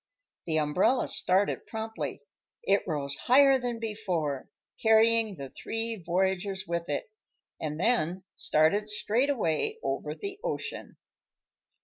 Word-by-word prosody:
The 160 -1 +1
umbrella 170 - +2
started 190 +2 +1
promptly. 220 -11 -5 0.4
It 200 +1 +3
rose 140 -4 -1
higher 270 +1 +5
than 245 -2 -3
before, 180 - -3 0.3
carrying 225 -1 +4
the 135 -4 -8
three 225 0 -3
voyagers 190 +1 -1
with 170 -1 -3
it, 145 +8 -3 0.5
and 155 0 -4
then 185 -4 +1
started 200 +8 +2
straight 225 +5 +1
away 270 - 0
over - - -2
the 400 -1 -6
ocean. - - -4
200 Hz, 115 wpm, -29 LUFS, 160-230 Hz, 0.5 s, higher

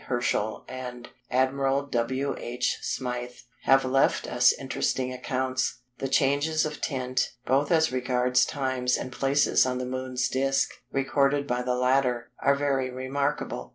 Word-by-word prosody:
Herschel 120 -3 -1
and 125 -2 -7 0.2
Admiral 135 +2 +1
W. 130 +2 -1
H. 120 +1 -2
Smyth 125 -1 -4 0.2
have 135 0 +5
left 135 +1 +2
us 125 0 +4
interesting 130 -1 -2
accounts. 130 0 -2 0.2
The 135 - -2
changes 145 +4 +2
of 150 0 -5
tint, 130 -2 -1
both 140 +4 +2
as 160 -3 +4
regards 125 0 +2
times 130 -3 0
and 130 - -5
places 135 +3 +3
on 125 -1 -1
the 125 - -3
Moon's 130 0 -2
disc, 135 +1 +1 0.2
recorded 140 +1 +1
by 125 -2 -1
the 125 0 -1
latter, 125 -1 +1
are 140 - +4
very 140 -2 0
remarkable. 140 +3 -3
130 Hz, 140 wpm, -27 LUFS, 125-135 Hz, 0.2 s, have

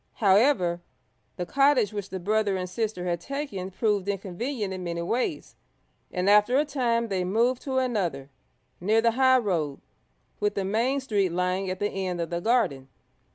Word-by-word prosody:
However, 195 -4 +3 0.5
the 180 - -3
cottage 275 -2 +3
which 200 -2 -5
the 190 - -5
brother 205 +1 +1
and 185 0 -3
sister 185 -1 -3
had 175 -1 -1
taken 275 -8 -4
proved 200 0 0
inconvenient 200 +3 -3
in 185 -1 -6
many 170 -1 -3
ways, 255 - -2 0.6
and 180 0 -1
after 210 +5 +5
a 295 - +3
time 235 -5 0
they 190 -2 0
moved 230 +7 +1
to 265 -2 -1
another, 180 - -1 0.5
near 215 +5 +2
the 230 0 +3
high 260 +2 +4
road, 170 - -1 0.6
with 210 0 0
the 195 - -1
main 240 +8 +1
street 205 -7 +1
lying 180 +2 -1
at 185 - -3
the 205 - 0
end 185 -2 -3
of 170 -1 -3
the 170 0 -2
garden. 175 - +1
205 Hz, 170 wpm, -26 LUFS, 180-240 Hz, 0.6 s, after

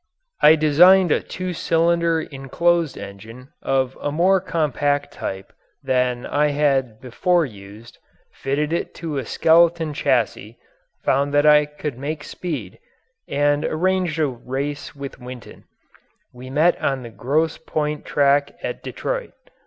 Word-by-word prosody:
I 155 - +8
designed 170 +4 +5
a - - +3
two 185 -1 -5
cylinder 170 0 +1
enclosed 160 +3 0
engine 110 +6 -10
of 130 -1 0
a 145 - -2
more 180 +5 +3
compact 145 -4 -1
type 95 0 -6 0.3
than 125 -1 0
I 150 +1 +1
had 135 -6 0
before 170 +8 +1
used, 105 0 -13 0.3
fitted 145 +3 -2
it 170 - -1
into 160 -4 -6
a 125 - -6
skeleton 165 -1 +3
chassis, 120 -5 -1 0.5
found 140 +2 +1
that 145 +1 +4
I 150 -1 +6
could 150 -3 -6
make 150 +2 -4
speed, 140 - -6 0.5
and 145 +1 +1
arranged 180 0 0
a 155 - +2
race 135 +3 -5
with 140 -2 -8
Winton. 125 -1 -11 0.7
We 125 +1 -10
met 155 +6 +2
on 135 -2 -1
the 120 - -9
Grosse 145 +9 -1
Point 150 -2 -3
track 140 0 +2
at - - -4
Detroit. - - -4
145 Hz, 135 wpm, -21 LUFS, 130-160 Hz, 0.7 s, I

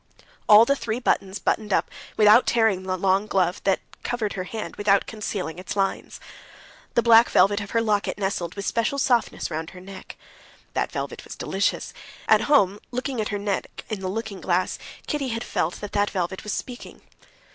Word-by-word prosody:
All 215 +2 +9
the 280 - +2
three 230 -3 -3
buttons 195 -5 0
buttoned 215 -1 -1
up - - +1 0.3
without 215 +3 +6
tearing 225 -5 +3
on - - -11
the 185 0 -1
long 195 +2 +2
glove 185 -3 +1
that 195 -1 +2 0.2
covered 230 -4 -2
her 185 -1 -4
hand 220 +3 -6
without 200 -1 +2
concealing 195 -6 -5
its 185 - -6
lines. 195 -1 -2 0.8
The 235 - +3
black 230 0 +7
velvet 205 +1 +4
of 205 - -7
her 230 0 +1
locket 210 -2 0
nestled 190 -4 -2
with 200 -1 -5
special 235 +4 0
softness 240 -9 0
round 160 +1 -4
her 185 - -12
neck. 190 +1 -10 0.6
That - - -1
velvet - - -5
was - - -9
delicious; 195 +1 -1 0.3
at - - +5
home, 205 -9 +4
looking 250 -1 -3
at 210 - -3
her 205 - -2
neck 200 -1 -4
in 215 -3 -3
the 190 - -4
looking 220 -1 -5
glass, 180 0 0 0.3
Kitty 295 -3 -2
had 230 -1 -3
felt 165 +3 -1
that 205 - -6
that 205 0 +1
velvet 185 0 -3
was 210 - -4
speaking. 245 +4 -7
205 Hz, 190 wpm, -24 LUFS, 190-225 Hz, 0.8 s, All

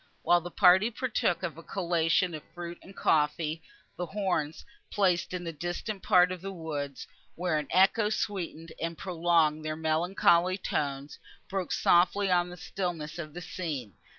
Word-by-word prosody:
While 175 0 +4
the 175 - -7
party 190 +4 +5
partook 235 -7 -1
of 165 -3 -4
a - - -9
collation 170 -1 +1
of 155 - -5
fruit 175 0 -7
and 195 - -14
coffee, 155 +1 +1 0.4
the 175 - -3
horns, 180 -7 -2 0.2
placed 185 -4 +1
in 180 -1 -4
a 165 - -3
distant 175 +6 -4
part 180 0 +5
of 185 -2 -5
the 195 +1 -5
woods, 150 -6 -5 0.3
where 175 -3 0
an 150 - -5
echo 195 +4 +4
sweetened 175 -6 -3
and 165 0 -3
prolonged 165 -4 +1
their 155 0 -3
melancholy 170 +3 +2
tones, 140 -5 -3 0.3
broke 190 -2 -3
softly 185 +3 +3
on 175 0 +3
the 180 - -9
stillness 170 -3 -4
of 155 -2 -7
the 175 - -5
scene. 150 - -5
175 Hz, 160 wpm, -29 LUFS, 160-185 Hz, 0.4 s, party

